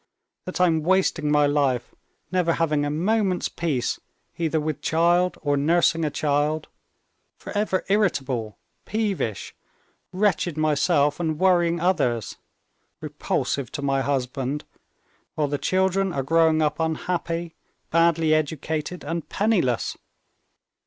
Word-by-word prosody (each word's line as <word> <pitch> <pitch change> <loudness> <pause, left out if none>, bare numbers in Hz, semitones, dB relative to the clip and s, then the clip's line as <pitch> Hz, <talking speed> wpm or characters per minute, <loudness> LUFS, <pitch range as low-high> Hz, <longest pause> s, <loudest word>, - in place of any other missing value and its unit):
That 185 - -5
I'm 165 -3 +3
wasting 170 -3 +1
my 150 0 +4
life, 140 -4 0 0.4
never 180 -2 +2
having 155 -3 +1
a - - -1
moment's 185 +4 0
peace, 150 -8 -2 0.4
either 160 -1 0
with 155 -1 -3
child, 175 +3 +2
or 145 -1 +1
nursing 165 +2 +2
a 155 - +1
child, 150 +1 0 0.7
forever 205 -2 -2
irritable, 135 - 0 0.3
peevish, 200 - -2 0.6
wretched 185 -4 0
myself 145 -1 +2
and 160 -3 -1
worrying 175 -1 +3
others, 125 - 0 0.6
repulsive 140 -4 -2
to 145 - -4
my 135 -1 +1
husband, 135 +1 -2 0.7
while 150 -2 +1
the 145 0 -2
children 190 +1 +1
are 135 - -1
growing 160 +2 +3
up 150 - -1
unhappy, 165 +1 -2 0.4
badly 165 -1 +3
educated, 155 +2 -2
and 165 0 -4
penniless. 190 - 0
160 Hz, 115 wpm, -24 LUFS, 145-180 Hz, 0.7 s, my